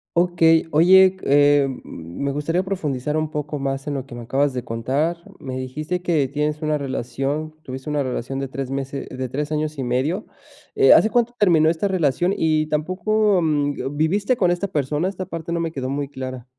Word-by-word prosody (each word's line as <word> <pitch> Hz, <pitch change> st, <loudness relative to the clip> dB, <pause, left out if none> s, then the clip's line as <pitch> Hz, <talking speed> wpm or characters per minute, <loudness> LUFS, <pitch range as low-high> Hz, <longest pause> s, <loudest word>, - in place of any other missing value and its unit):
Okey, 165 Hz, -2 st, +4 dB
oye, 185 Hz, +4 st, +6 dB
eh, 145 Hz, 0 st, +4 dB, 0.2 s
me 85 Hz, -, -5 dB
gustaría 165 Hz, +5 st, 0 dB
profundizar 150 Hz, -7 st, -2 dB
un 155 Hz, 0 st, -1 dB
poco 150 Hz, 0 st, -4 dB
más 135 Hz, +1 st, -3 dB
en 145 Hz, -, -1 dB
lo 135 Hz, -1 st, -4 dB
que 125 Hz, -, -12 dB
me 120 Hz, 0 st, -7 dB
acabas 135 Hz, +3 st, +1 dB
de 125 Hz, -, -3 dB
contar. 135 Hz, +9 st, -1 dB, 0.2 s
Me 130 Hz, -1 st, -6 dB
dijiste 155 Hz, +7 st, -4 dB
que 160 Hz, -6 st, +1 dB
tienes 150 Hz, +2 st, -2 dB
una 155 Hz, -1 st, 0 dB
relación, 140 Hz, +3 st, -3 dB
tuviste 130 Hz, +1 st, -7 dB
una 145 Hz, -1 st, 0 dB
relación 130 Hz, +1 st, -4 dB
de 135 Hz, -1 st, -3 dB
3 135 Hz, -1 st, -5 dB
meses 135 Hz, 0 st, -4 dB
de 130 Hz, -1 st, -5 dB
3 150 Hz, +3 st, -3 dB
años 155 Hz, 0 st, -2 dB
y 135 Hz, -, -2 dB
medio. 135 Hz, -, -1 dB, 0.5 s
Eh, 415 Hz, -1 st, +6 dB
¿hace 220 Hz, -, +5 dB
cuánto 240 Hz, 0 st, +1 dB
terminó 165 Hz, -6 st, +4 dB
esta 170 Hz, +5 st, 0 dB
relación? 175 Hz, 0 st, +1 dB
Y 155 Hz, -1 st, +1 dB
tampoco 185 Hz, +6 st, +1 dB
mm, 145 Hz, -2 st, -1 dB
¿viviste 200 Hz, -, +1 dB
con 180 Hz, -5 st, +2 dB
esta 175 Hz, +3 st, -1 dB
persona? 150 Hz, 0 st, -1 dB
Esta 190 Hz, -1 st, -4 dB
parte 165 Hz, -1 st, -5 dB
no 170 Hz, -, -1 dB
me 165 Hz, -1 st, -2 dB
quedó 130 Hz, -3 st, -4 dB
muy 140 Hz, 0 st, -3 dB
clara. 130 Hz, -2 st, -6 dB
150 Hz, 190 wpm, -22 LUFS, 135-170 Hz, 0.5 s, oye